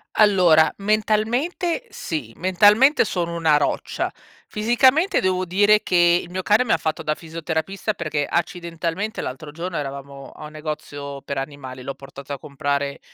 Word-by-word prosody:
Allora, 180 -7 +5
mentalmente 220 - 0
sì, 145 - -5
mentalmente 210 - +4
sono 170 -4 -2
una 160 -3 +3
roccia. 145 - -1 0.4
Fisicamente, 260 - +3
devo 185 0 0
dire 205 +4 +4
che 175 -1 +4
il 175 - -12
mio 185 +1 -3
cane 210 +6 +3
mi 225 - -1
ha - - +4
fatto 160 +1 -3
da 155 - 0
fisioterapista, 165 +5 -3
perché 155 -6 -2
accidentalmente 170 +4 -3
l'altro 135 +4 -6
giorno 170 +3 -5
eravamo 140 -1 -7
a 155 - -11
un - - -13
negozio 150 -2 -6
per 140 - -5
animali, 135 -2 -6
l'ho 135 - -4
portato 140 +1 -10
a 140 - -6
comprare 140 -1 -2
170 Hz, 150 wpm, -22 LUFS, 145-205 Hz, 0.4 s, Allora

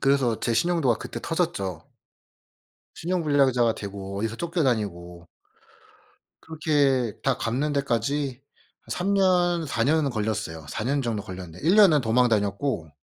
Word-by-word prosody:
그래서 135 -5 +2
제 120 - 0
신용도가 160 -5 +2
그때 - - -7
터졌죠. 160 - -2 1.1
신용불량자가 140 -9 +2
되고 100 -2 -6
어디서 110 +2 -2
쫓겨 170 +2 -1
다니고 90 -8 -2 1.1
그렇게 145 -7 +1
다 135 -3 +1
갚는 135 +6 -1
데까지 140 0 -1 0.5
한 - - -15
3 195 +3 0
년 180 -3 +2
4 115 -5 -1
년은 150 +2 +2
걸렸어요. 105 - -3
4 105 - -4
년 140 +4 +1
정도 115 -5 -2
걸렸는데 90 -3 -9
1 175 - +5
년은 185 -9 +6
도망 120 +2 +3
다녔고 100 - -1
125 Hz, 275 characters per minute, -25 LUFS, 105-155 Hz, 1.1 s, 년은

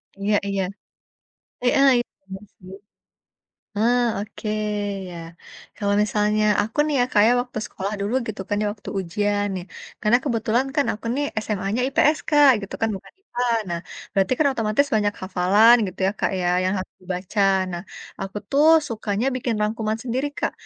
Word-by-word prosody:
Iya-iya. 200 -1 0 1.0
Heeh, 275 +3 +4
i - - +3 0.3
iya 190 - -5 0.2
sih. 185 0 -13 1.0
Eee, 240 +3 +3 0.2
oke 210 +1 -6 0.6
ya. 175 - -8 0.6
Kalau 200 -2 0
misalnya 210 +1 +1 0.2
aku 220 +6 -5
nih 300 -1 -1
ya 245 - +4
Kak 205 - +4
ya - - +5
waktu 245 -3 -6
sekolah 200 +2 -5
dulu 205 +4 -2
gitu 210 -3 -5
kan 205 - -1
ya - - 0
waktu 205 - -10
ujian 205 +3 -1
nih, 180 -1 -5 0.4
karena 215 +3 +4
kebetulan 235 0 0
kan 285 - +2
aku 215 - -11
nih 290 - 0 0.2
SMA-nya 205 +3 -1
IPS 300 +3 +3
Kak, 295 -3 +6
gitu 200 - -8
kan, 225 - +2
bukan 190 - -12
IPA, 245 - -5 0.3
nah 170 0 -2 0.3
berarti 195 +4 +2
kan 310 - +2
otomatis 225 +4 +1
banyak 205 -1 +1
hafalan 195 +5 +5
gitu 185 - -9
ya - - +1
Kak - - +1
ya, 175 - 0 0.2
yang 185 +1 +1
harus 185 - -8
dibaca. 185 +3 -3 0.3
Nah, 175 0 -4 0.4
aku 195 +2 -5
tuh 290 +2 +3 0.2
sukanya 220 +1 -2
bikin 245 -2 -1
rangkuman 215 0 -1
sendiri 255 +3 -1
Kak. - - -1
210 Hz, 165 wpm, -23 LUFS, 195-245 Hz, 1.0 s, Kak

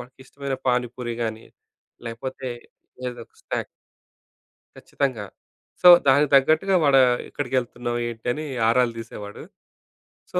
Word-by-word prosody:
వాడికిష్టమైన 130 +2 -7
పానిపూరి 125 -1 -1
గాని, 110 0 -5 0.6
లేకపోతే 130 +3 -6 0.6
ఏదో 120 -1 -8
ఒక - - -42
స్నాక్. - - -3 1.1
ఖచ్చితంగా. 130 -7 -3 0.6
సో 180 - +6 0.2
దానికి 140 +2 +4
తగ్గట్టుగా 155 +8 +3
వాడా 135 -2 +6 0.3
ఎక్కడికెళ్తున్నావు 125 -3 -3
ఏంటిని 120 +6 -4 0.2
ఆరాలు 120 0 +2
తీసేవాడు. 105 -2 -9 0.9
సో - - 0
125 Hz, 100 wpm, -23 LUFS, 120-135 Hz, 1.1 s, సో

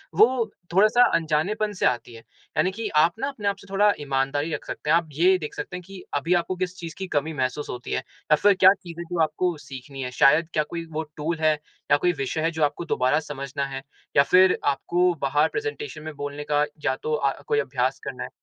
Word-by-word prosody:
वो 225 +2 +4 0.2
थोड़ा-सा 215 +5 +5
अनजानेपन 170 +7 0
से 185 - -1
आती 120 -1 0
है। 115 - -11 0.4
यानी 185 - +3
कि 220 +2 -4 0.2
आप 170 +2 +2
ना, 270 - -1
अपने 230 -8 -4
आप 200 - +1
से 200 - -15
थोड़ा 205 +1 +4
ईमानदारी 145 +2 -1
रख़ - - -4
सकते 150 - -5
हैं। 165 - +6
आप 165 -2 -3
ये 180 +5 +4
देख 150 -4 -6
सकते - - -5
हैं 180 - -10
कि 195 -2 -10
अभी 165 +5 +1
आपको 175 +1 0
किस 180 0 -3
चीज़ 165 -2 -7
की 190 - -4
कमी 155 +2 0
महसूस 130 +1 -2
होती 125 0 -6
है - - +1
या 150 +3 -1
फिर 205 +6 +4
क्या 190 0 +7
चीज़ 175 -4 -11
है, - - -3
जो 175 - -1
आपको 175 +2 0
सीखनी 135 +1 -8
है? 125 - -4
शायद 155 +6 +4
क्या 155 - +2
कोई 170 -1 -5
वो 160 +1 -2
टूल 160 +2 -2
है 155 -1 +4 0.4
या 145 - +7
कोई 175 +3 +2
विषय 140 +1 -2
है, 165 +1 +1
जो 160 -1 -1
आपको 150 +3 0
दोबारा 130 +4 +2
समझना 140 -2 -4
है, 135 -1 -6 0.4
या 140 - +8
फिर 185 +5 +5
आपको 175 +5 +2
बाहर 145 +3 +3
प्रेज़ेंटेशन 440 - -5
में 155 0 -6
बोलने 145 +1 -5
का 145 0 +3 0.2
या 130 - +2
तो 155 - -1
अ, 140 -2 0
कोई 440 -1 +2
अभ्यास - - -1
करना - - -5
है? - - -6
160 Hz, 235 wpm, -25 LUFS, 145-185 Hz, 0.4 s, या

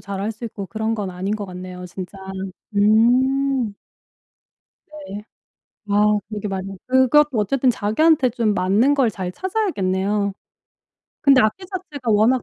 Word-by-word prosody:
잘할 200 +2 -4
수 225 +3 -10
있고 200 -3 -6
그런 220 +5 -2
건 200 -4 -3
아닌 190 +4 -3
것 205 - -5
같네요 180 0 -8
진짜. 185 +2 -8 0.6
음. 245 +3 +3 1.1
네. 290 -10 -9 0.7
아 210 +1 +3
그게 210 -1 -4
맞 190 -1 -3 0.2
그것도 260 +1 +4
어쨌든 255 +5 +2
자기한테 255 +6 +3
좀 230 -3 0
맞는 205 +9 +3
걸 270 -5 +3
잘 185 -3 -5
찾아야겠네요. 200 - -1 0.9
근데 275 -2 +6
악기 215 - 0
자체가 315 - -5
워낙 220 +4 +3
215 Hz, 250 characters per minute, -21 LUFS, 200-265 Hz, 1.1 s, 근데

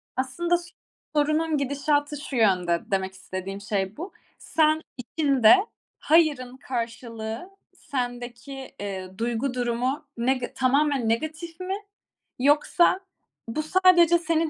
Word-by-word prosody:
Aslında 270 +7 0 0.6
sorunun 305 +1 +2
gidişatı 290 +1 0
şu 280 - -6
yönde, 180 -7 +3
demek 190 -1 0
istediğim 190 +1 -6
şey 200 -1 -2
bu. 355 +6 -7 0.2
Sen 315 0 +2 0.2
içinde 265 -1 +4 0.4
"hayırın" 290 -6 +2
karşılığı 230 - -5 0.3
sendeki, 245 0 -5
ııı, 190 -2 -6
duygu 240 +3 -1
durumu 250 +4 -1
nega 250 +1 0
tamamen 270 -2 +2
negatif 315 +7 -3
mi? 370 +1 -2 0.6
Yoksa, 295 +7 +4 0.5
bu 270 +7 -2
sadece 345 0 +5
senin 330 -1 +1
265 Hz, 105 wpm, -25 LUFS, 230-310 Hz, 0.6 s, sadece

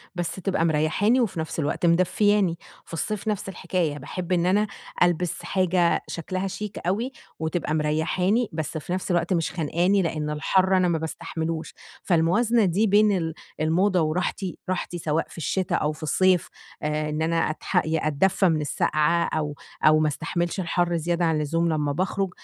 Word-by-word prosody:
بس 175 -2 -2
تبقى 190 -3 0
مريّحاني 165 +10 +2
وفي 190 -7 -1
نفس 160 +1 -4
الوقت 155 +3 -1
مدفّياني، 185 +1 +3 0.3
في - - -14
الصيف 210 +5 -3
نفس 210 -2 -2
الحكاية 175 -4 -2
باحب 175 +6 -6
إن 175 -1 +2
أنا 205 +3 +3 0.4
ألبس 175 -1 0
حاجة 180 -2 +1
شكلها 185 +3 -3
شيك 210 +2 -6
أوي 225 +8 0 0.3
وتبقى 160 0 -2
مريّحاني، 180 +9 +1
بس 155 0 -3
في 165 +3 -4
نفس 185 0 -2
الوقت 175 +1 +1
مش 165 -2 0
خنقاني؛ 175 +4 +1
لأن 155 -2 -2
الحر 185 +5 +2
أنا 185 - +3
ما 170 -2 +1
باستحملوش. 160 0 -4 0.3
فالموازنة 205 +7 +3
دي 195 +5 +2
بين 205 0 +4
ال 160 -2 -2 0.3
الموضة 180 +4 +2
وراحتي، 180 +3 -2
راحتي 180 -1 -2
سواء 160 -1 -1
في - - -14
الشتا 185 +3 -1
أو 150 - +1
في 155 +1 -10
الصيف، 180 +3 +2 0.3
آآ 150 0 -1
إن 150 +1 -2
أنا 165 0 +1
أتحق 155 - 0
أدّفى 160 +4 +2
من 155 -2 +1
السقعة 155 +3 +1
أو 150 -2 -2 0.3
أو 155 0 +6
ما 155 - +2
استحملش 170 +4 -2
الحر 175 -1 0
زيادة 170 +2 0
عن 160 -2 +1
الزوم، 165 +3 0
لمّا 150 -2 0
باخرج 190 +4 -1
170 Hz, 165 wpm, -25 LUFS, 155-185 Hz, 0.4 s, أو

